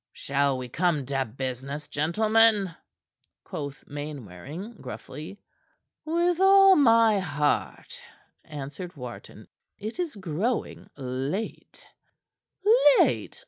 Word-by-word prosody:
"Shall 140 -1 0
we 130 -1 -5
come 160 +1 0
to 135 0 -1
business, 130 +4 -5
gentlemen?" 210 +4 +3 0.7
quoth 140 -2 -7
Mainwaring 145 - -8
gruffly. 150 +8 -9 0.7
"With 345 +2 +1
all 390 0 +7
my 230 - +5
heart," 150 -5 -2 0.4
answered 150 +4 -8
Wharton. 125 -4 -10 0.3
"It 220 - -7
is 345 -7 -2
growing 195 +6 -3
late." 135 - -5 1.1
"Late! - - +1
155 Hz, 90 wpm, -26 LUFS, 135-220 Hz, 1.1 s, all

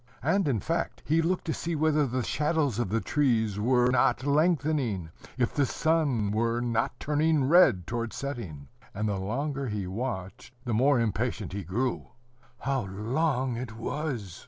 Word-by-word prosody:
And, 175 +4 +2
in 125 -6 +1
fact, 165 - -2
he 160 +2 +3
looked 175 +3 -1
to 160 - -1
see 170 0 -3
whether 155 -1 +2
the 125 0 -1
shadows 150 -3 0
of 120 - -1
the 115 +3 0
trees 110 -8 +1
were 125 +2 +3
not 130 0 +2
lengthening, 145 - +1 0.3
if 120 -2 0
the 140 -2 +2
sun 145 -12 +1
were 115 +2 +1
not 120 +2 -1
turning 150 0 +2
red 130 - +5
towards 115 +2 -3
setting; 105 - -6 0.3
and 105 +2 -1
the 100 -2 -1
longer 135 +7 -2
he 105 -4 -3
watched, 100 +2 -5
the 120 - -1
more 130 +4 +4
impatient 110 -3 -1
he 100 0 -4
grew. 115 +9 -2 0.5
How 135 -5 -1
long 125 +6 -1
it 120 -2 -6
was! 120 - -4
125 Hz, 160 wpm, -28 LUFS, 110-145 Hz, 0.5 s, red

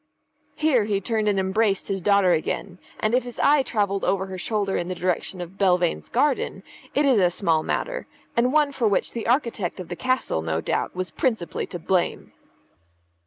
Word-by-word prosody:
Here 275 -9 +2
he 205 -2 0
turned 215 +1 -1
and 200 -2 +2
embraced 195 +1 +1
his 195 -2 -2
daughter 200 -1 +4
again; 180 +3 -2 0.2
and 215 +1 0
if 250 - +3
his 245 -1 -9
eye 290 0 +4
travelled 200 -6 -1
over 190 -1 +1
her 190 -1 -7
shoulder 205 -1 -1
in 175 - -1
the 185 - -3
direction 180 +1 -2
of 175 +3 -9
Belvane's 180 -3 +2
garden, 270 +2 0 0.3
it 290 - +3
is 260 -6 +4
a 180 -2 +4
small 170 -3 +1
matter, - - -3 0.3
and 245 +2 +3
one 300 -1 +3
for 245 -5 0
which 200 - +1
the 230 -2 -5
architect 235 - 0
of 180 - -7
the 175 - -4
castle, 255 - 0
no 80 0 -1
doubt, - - -2
was 185 0 -3
principally 225 - -1
to - - -6
blame. 175 +1 -1
200 Hz, 190 wpm, -24 LUFS, 180-240 Hz, 0.3 s, daughter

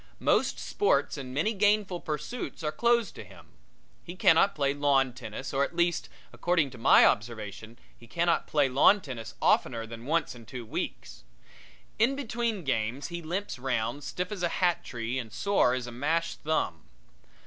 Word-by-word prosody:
Most - - +2
sports 410 - +1
and 135 -3 -7
many 155 - 0
gainful 205 -3 +2
pursuits 155 - -5
are 150 - 0
closed 235 +1 +1
against - - -10
him. - - -16 0.6
He 175 - -8
cannot 185 +3 +4
play 140 -2 +1
lawn 140 -3 +2
tennis, 130 +2 -7
or, 135 +1 +2
at 165 - -4
least 170 0 +1 0.2
according 170 -6 +1
to 120 - -11
my - - +7
observation, 110 0 -2 0.2
he 115 - -17
cannot 170 +6 +1
play 145 -3 +2
lawn 140 +10 +5
tennis 120 - -7
oftener 115 -3 +2
than 115 +2 -9
once 165 0 0
in 115 -3 -14
two 125 0 -7
weeks. - - -5 0.8
In 245 +5 +3
between 235 -6 -2
games 130 +1 -2
he 170 0 -5
limps 175 -1 -4
round, 125 +1 -2
stiff 180 +6 -4
as 205 -3 -5
a 175 - +1
hat 175 -1 +1
tree 120 +1 -4
and 115 -3 -7
sore 160 - +2
as 125 -2 -3
a 120 - -7
mashed 160 +7 -1
thumb. 150 - -1
145 Hz, 170 wpm, -28 LUFS, 120-180 Hz, 0.8 s, my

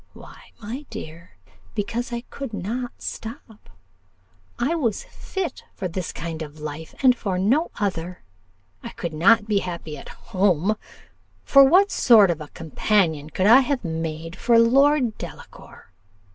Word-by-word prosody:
Why, - - -14
my 245 +8 -7
dear, 165 +2 -10 0.4
because 230 +3 -3
I 235 0 -3
could 275 -5 -6
not 240 +6 -5
stop: 220 - -8 0.9
I 275 +7 0
was 245 -11 -1
fit 375 -7 -6
for 190 - -3
this 180 0 -4
kind 165 0 -6
of 155 0 -8
life 155 +1 -7
and 255 -2 +6
for 195 -6 -3
no 250 - +2
other: 180 -3 -3 0.6
I - - -7
could 170 -2 -5
not 210 +7 +4
be 210 -2 +2
happy 170 -5 -6
at - - -11
home; 195 -1 0 0.7
for 275 0 +7
what 370 +9 +5
sort 215 -7 +6
of 160 -2 -4
a 150 - -7
companion 160 -1 0
could 185 - -1
I 235 +5 +8
have 275 -4 -1
made 165 +1 -4
of - - -13
Lord 245 +1 +4
Delacour? - - -11
205 Hz, 145 wpm, -23 LUFS, 165-245 Hz, 0.9 s, I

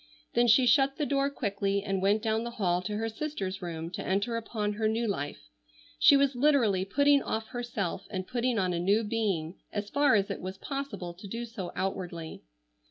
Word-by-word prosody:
Then 240 +1 +4
she 250 +3 +6
shut 270 +2 +4
the 300 - 0
door 275 0 +1
quickly 200 -6 -1
and 195 -2 -1
went 205 +3 +2
down 220 0 +1
the 235 - -3
hall 180 -4 +1
to 210 +3 -3
her 225 +1 -1
sister's 220 -6 -4
room 165 -1 -5
to - - -5
enter 200 +5 0
upon 220 -2 -2
her 215 +1 0
new 225 +2 0
life. 145 - -4 0.5
She 285 -3 +7
was 280 -1 +3
literally 245 -9 +3
putting 285 +6 +4
off 220 -2 -3
herself 230 -7 -3
and 185 -2 -4
putting 245 +1 0
on 185 -3 +1
a 170 - -1
new 200 +6 +2
being 200 -7 -1
as 205 0 -4
far 285 -5 +4
as 200 -1 +1
it - - -5
was 185 +1 -6
possible 275 -10 -5
to 185 +4 -11
do 230 +4 -4
so 215 -6 -6
outwardly. 175 -4 -4
210 Hz, 200 wpm, -29 LUFS, 190-240 Hz, 0.5 s, She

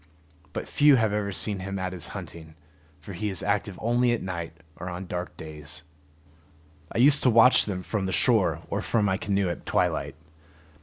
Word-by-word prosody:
But - - -5
few 145 -1 +5
have 110 -4 +1
ever 105 -1 -1
seen 100 0 0
him 100 +1 -5
at 95 -1 -3
his 90 -3 -2
hunting, 80 -1 -10 0.5
for 100 - -9
he 105 +4 -3
is 95 -4 -1
active 100 -1 -1
only 120 +1 +2
at 120 - -3
night 85 -3 -5 0.2
or 90 +2 -6
on 90 +2 -6
dark 90 0 -6
days. 75 -1 -7 1.1
I - - -4
used 140 +4 +6
to 130 - +4
watch 115 +2 +6
them 90 -3 -4
from 100 -2 -2
the - - -2
shore - - +2
or - - -1
from 110 -3 0
my 95 -1 +1
canoe 100 -2 0
at 85 - -4
twilight. - - -1
100 Hz, 190 wpm, -26 LUFS, 90-110 Hz, 1.1 s, used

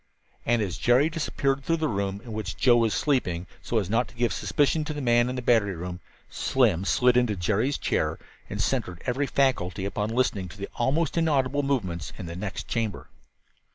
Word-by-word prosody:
And 120 -2 +3
as 90 -5 -4
Jerry 130 +6 +4
disappeared 140 -4 -1
through 165 +3 +1
the 160 -1 0
room 100 -3 -2
in 115 - -8
which 105 -3 -4
Joe 120 -2 +5
was 115 -2 +2
sleeping, 95 - 0 0.2
so 120 - -1
as 100 -5 +1
not 115 +5 +1
to - - -17
give 120 -4 +1
suspicion 150 +7 +1
to 155 -1 -4
the - - -3
man 120 -1 +3
in 130 - -3
the 125 - -4
battery 110 -6 +3
room, 90 +1 -6 0.3
Slim 105 -9 +1
slid 125 +4 +3
into 120 -4 +2
Jerry's 110 +9 0
chair - - 0 0.3
and - - -5
centered 90 -1 -1
every 135 +3 0
faculty 100 -11 +1
upon 105 +1 -2
listening 115 -5 0
to 95 - -12
the 100 - -6
almost 155 +7 +1
inaudible 145 -3 +2
movements 100 - -2
in - - -6
the 85 0 -6
next 100 +1 -5
chamber. 115 -4 -3
120 Hz, 195 wpm, -26 LUFS, 100-135 Hz, 0.3 s, Joe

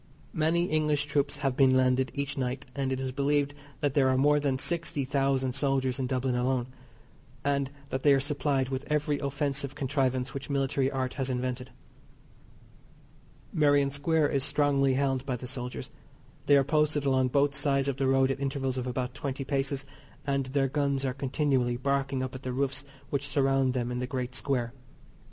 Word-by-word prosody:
Many 165 +1 +2
English 150 -3 +1
troops 145 -1 0
have 135 -2 +1
been 130 -1 +5
landed 130 0 +3
each 140 0 -2
night, 130 -1 -2
and 135 -1 -1
it 130 - -1
is 130 -1 -2
believed 145 +1 +1 0.3
that 145 -2 +1
there 135 -2 +4
are 130 - +2
more 145 +2 +4
than 140 -2 0
sixty 165 -2 -1
thousand 135 -1 +1
soldiers 135 -1 0
in 130 - 0
Dublin 130 0 0
alone, 125 0 +1 0.8
and 140 -1 +1 0.2
that 130 - -2
they 145 - +5
are - - +2
supplied 140 -1 0
with 135 0 -3
every 150 -1 +1
offensive 140 -1 -2
contrivance 130 -2 0
which 140 +1 -6
military 135 -1 +1
art 130 -2 -2
has 135 -1 -2
invented. 125 0 -2 1.8
Merrion 145 -2 +3
Square 150 +2 +2
is 140 -2 0
strongly 140 -2 +2
held 135 -1 +1
by 130 -2 -2
the 125 - -7
soldiers. 125 0 -6 0.6
They 145 - +7
are 140 - +4
posted 150 0 +1
along 130 -1 +3
both 140 +2 +2
sides 140 -1 +1
of 135 -2 -1
the 135 -1 +1
road 135 0 +3
at 135 - -3
intervals 135 -2 -1
of 125 - -4
about 125 0 -2
twenty 135 0 -4
paces, 140 0 -1 0.4
and 140 -1 0
their 135 +1 +1
guns 140 -1 0
are 130 - 0
continually 130 -2 0
barking 135 0 0
up 130 - -4
at 130 - -7
the 130 - -4
roofs 135 +1 -1 0.3
which 140 0 -1
surround 135 -2 +2
them 120 -1 -1
in 125 - -2
the 125 - -2
great 125 -1 -3
square. 125 -2 -1
135 Hz, 180 wpm, -29 LUFS, 130-140 Hz, 1.8 s, They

